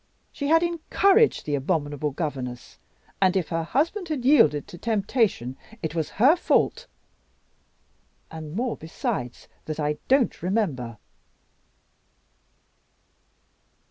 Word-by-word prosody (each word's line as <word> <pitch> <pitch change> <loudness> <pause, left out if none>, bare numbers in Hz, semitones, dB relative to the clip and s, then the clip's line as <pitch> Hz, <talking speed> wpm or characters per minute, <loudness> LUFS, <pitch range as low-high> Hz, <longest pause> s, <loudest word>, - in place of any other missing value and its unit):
She 285 - -4
had 325 +2 +4
encouraged 385 +6 +2
the 150 - -2
abominable 145 0 -1
governess; 130 -5 -5 0.4
and 190 0 +4
if 180 - -2
her 165 -1 -1
husband 325 - -1
had 280 -6 -3
yielded 155 - +4
to 175 - -10
temptation, 205 - 0 0.3
it 160 - -2
was 160 -3 -2
her 265 - +6
fault. 480 +6 +1 1.4
And 155 0 -8
more 245 +2 -1
besides, 125 -6 -4 0.2
that 155 0 -5
I 150 0 -1
don't 265 -2 +2
remember." 155 - -1
180 Hz, 110 wpm, -25 LUFS, -, 1.4 s, her